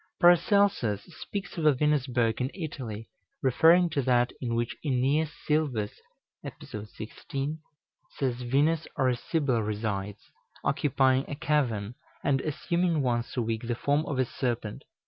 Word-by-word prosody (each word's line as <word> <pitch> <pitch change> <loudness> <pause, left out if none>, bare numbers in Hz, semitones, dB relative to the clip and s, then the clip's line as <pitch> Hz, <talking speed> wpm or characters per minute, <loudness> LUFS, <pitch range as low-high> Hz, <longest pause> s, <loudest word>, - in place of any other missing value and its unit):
Paracelsus 175 - +4 0.2
speaks 200 -3 -5
of 160 - -1
a 150 - +5
Venusberg 130 -5 +1
in 125 - 0
Italy, 125 - -6 0.4
referring 165 +7 +5
to 145 - +1
that 125 -1 +2
in 115 -2 -1
which 120 0 -1
Æneas 140 +3 +1 0.2
Sylvius 140 -9 0 0.4
(Ep. - - -6
16) 125 +8 -6 0.6
says 125 -3 -1
Venus 145 +6 +1
or 130 - +3
a 125 - +1
Sibyl 135 -3 0
resides, 105 -1 -4 0.3
occupying 135 -1 +2
a 145 - -3
cavern, 125 -8 0 0.3
and 135 -1 +2
assuming 170 +1 0
once 120 0 -1
a 120 - +2
week 115 +1 -3
the 120 - 0
form 145 +5 +1
of 140 - -2
a 130 - +3
serpent. 120 -3 -3
130 Hz, 140 wpm, -28 LUFS, 115-150 Hz, 0.6 s, a